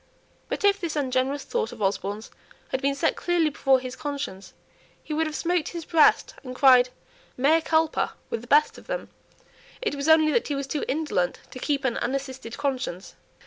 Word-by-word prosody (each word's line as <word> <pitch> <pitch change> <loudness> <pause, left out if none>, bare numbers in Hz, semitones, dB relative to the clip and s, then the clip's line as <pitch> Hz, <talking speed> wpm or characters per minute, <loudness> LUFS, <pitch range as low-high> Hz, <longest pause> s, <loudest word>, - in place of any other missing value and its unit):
But - - -3
if 405 0 +3
this 330 -3 -3
ungenerous 270 0 0
thought 470 -2 -2
of 235 - -11
Osborne's 200 +2 -2 0.4
had 260 - -2
been 280 0 +1
set 280 - +1
clearly 345 -3 +1
before 270 -2 +3
his 255 0 -7
conscience, 280 -10 -5 0.5
he 310 - -5
would 320 +1 +1
have 305 - -5
smote 350 -1 0
his 335 -2 -6
breast 330 +10 +4
and 255 -1 -7
cried 255 -2 +6 0.5
"Mea 305 +6 +4
culpa" 320 0 +1 0.2
with 225 - -2
the 240 - -13
best 295 +4 +3
of - - -18
them; - - -4 0.7
it 460 - -2
was 285 +2 -2
only 315 -1 +6
that 465 - +1
he 290 - -2
was 275 0 -3
too 285 +2 -3
indolent 275 - -1
to 255 - -8
keep 280 0 -1
an 245 - 0
unassisted 260 -2 -4
conscience. 260 -10 -3
280 Hz, 185 wpm, -25 LUFS, 255-320 Hz, 0.7 s, cried